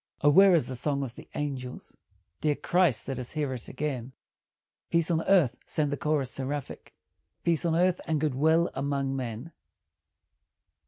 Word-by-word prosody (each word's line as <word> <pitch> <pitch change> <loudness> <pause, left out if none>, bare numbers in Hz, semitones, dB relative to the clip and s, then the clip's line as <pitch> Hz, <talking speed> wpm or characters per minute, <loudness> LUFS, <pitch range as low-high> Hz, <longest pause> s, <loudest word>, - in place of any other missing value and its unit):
O 145 - +5
where 190 +3 +7
is 150 -8 +2
the 130 - -4
song 140 +2 -1
of 125 -3 -6
the - - -13
angels? 130 -4 -5 0.5
Dear 150 -1 +2
Christ, 170 -11 +1
let 135 -2 -3
us 125 - -5
hear 150 -4 -1
it 120 -4 -8
again; 130 -3 -4 0.8
"Peace 170 0 +2
on 165 -1 +2
earth," 165 -11 +4
send 150 -2 0
the - - 0
chorus 145 -4 -1
seraphic, 135 +1 -5 0.5
"Peace 170 -1 +1
on 165 -1 +2
earth, 180 +1 +2
and 160 -2 +1
good 150 -2 0
will 160 +5 +3
among 135 0 -1
men." 125 +3 -5
145 Hz, 165 wpm, -28 LUFS, 130-160 Hz, 0.8 s, where